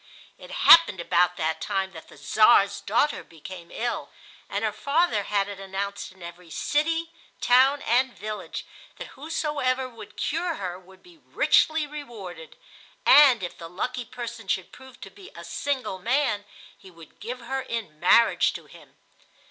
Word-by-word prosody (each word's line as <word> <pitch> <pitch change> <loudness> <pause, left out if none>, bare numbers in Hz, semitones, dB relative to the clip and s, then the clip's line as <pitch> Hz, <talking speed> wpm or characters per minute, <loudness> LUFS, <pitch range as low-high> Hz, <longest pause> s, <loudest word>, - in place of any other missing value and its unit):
It - - -14
happened 330 - +6
about 175 +1 +2
that 160 0 -2
time 195 -2 -2
that 160 -3 -12
the - - -16
Czar's 205 -2 +4
daughter 265 +8 0
became 170 +2 -11
ill, 240 +1 -3 0.4
and 205 +2 -2
her 215 - 0
father 280 - +1
had 200 -1 0
it 200 -1 -8
announced 195 +1 -5
in 185 -1 -16
every 170 0 -11
city, 325 - -1 0.3
town, 265 +3 +4
and 255 +3 +2
village 215 0 -6 0.3
that - - -8
whosoever 285 -4 -2
would 215 -4 -13
cure 335 +2 -1
her 185 -5 -5
would 190 +1 -19
be 345 -2 -19
richly 315 0 +2
rewarded; 220 - -9 0.5
and 270 -8 +7
if 175 - -5
the 165 -1 -8
lucky 250 +8 -3
person 235 -3 -8
should 190 -1 -2
prove 260 -2 -15
to - - -10
be 395 -1 -14
a - - -9
single 255 -9 -3
man 230 -1 0 0.3
he 190 - -16
would 165 -3 -17
give 245 +4 -6
her 265 +3 -3
in 220 -12 -6
marriage 230 +7 +4
to - - -9
him. - - -17
225 Hz, 160 wpm, -25 LUFS, 190-270 Hz, 0.5 s, and